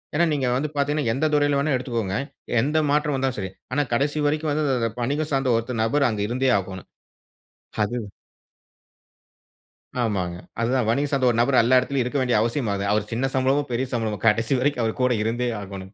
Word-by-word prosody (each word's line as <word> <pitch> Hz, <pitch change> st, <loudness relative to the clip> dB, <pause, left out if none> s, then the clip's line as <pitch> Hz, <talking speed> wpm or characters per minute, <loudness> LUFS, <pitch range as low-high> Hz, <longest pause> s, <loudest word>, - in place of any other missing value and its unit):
ஏன்னா 170 Hz, +3 st, +4 dB
நீங்க 140 Hz, -3 st, 0 dB
வந்து 150 Hz, +3 st, -2 dB
பார்த்தீங்கன்னா, 145 Hz, -2 st, 0 dB
எந்த 135 Hz, +6 st, 0 dB
துறையில 145 Hz, -1 st, +3 dB
வேண்னாலும் 140 Hz, -1 st, +1 dB
எடுத்துக்கோங்க. 115 Hz, -6 st, -3 dB, 0.5 s
எந்த 150 Hz, +5 st, 0 dB
மாற்றம் 150 Hz, 0 st, +1 dB
வந்தாலும் 130 Hz, -2 st, -1 dB
சரி. 95 Hz, -2 st, -4 dB, 0.2 s
ஆனா 145 Hz, -, +2 dB
கடைசி 145 Hz, +4 st, +1 dB
வரைக்கும் 155 Hz, +1 st, 0 dB
வந்து 155 Hz, +1 st, 0 dB, 0.4 s
வணிகம் 145 Hz, +5 st, -1 dB
சார்ந்த 135 Hz, -2 st, +1 dB
ஒரு 115 Hz, +2 st, -3 dB
நபர் 140 Hz, +5 st, +2 dB
அங்கு 105 Hz, -3 st, -2 dB
இருந்தே 130 Hz, +2 st, +1 dB
ஆகணும். 95 Hz, -1 st, -8 dB, 1.0 s
அது 105 Hz, +4 st, -3 dB, 2.1 s
ஆமாங்க. 95 Hz, -6 st, -1 dB, 0.3 s
அதுதான் 120 Hz, -1 st, +1 dB
வணிக 140 Hz, +5 st, +1 dB
சார்ந்த 135 Hz, -3 st, +2 dB
ஒரு 115 Hz, -, -2 dB
நபர் 130 Hz, +2 st, +2 dB
எல்லா 125 Hz, +2 st, +5 dB
இடத்திலும் 135 Hz, +1 st, -1 dB
இருக்க 125 Hz, +4 st, -2 dB
வேண்டிய 125 Hz, -4 st, +2 dB
அவசியமாகுது. 110 Hz, -4 st, -1 dB
அவர் 105 Hz, 0 st, 0 dB
சின்ன 130 Hz, +4 st, 0 dB
சம்பளமோ, 135 Hz, +2 st, +2 dB
பெரிய 125 Hz, +2 st, -1 dB
சம்பளமோ 110 Hz, -3 st, -1 dB
கடைசி 115 Hz, +4 st, +3 dB
வரைக்கும் 130 Hz, -2 st, 0 dB
அவர் 110 Hz, +2 st, -2 dB
கூட 125 Hz, -1 st, +3 dB
இருந்தே 120 Hz, +2 st, -1 dB
ஆகோணும். 95 Hz, 0 st, -9 dB
125 Hz, 175 wpm, -23 LUFS, 115-140 Hz, 2.1 s, எல்லா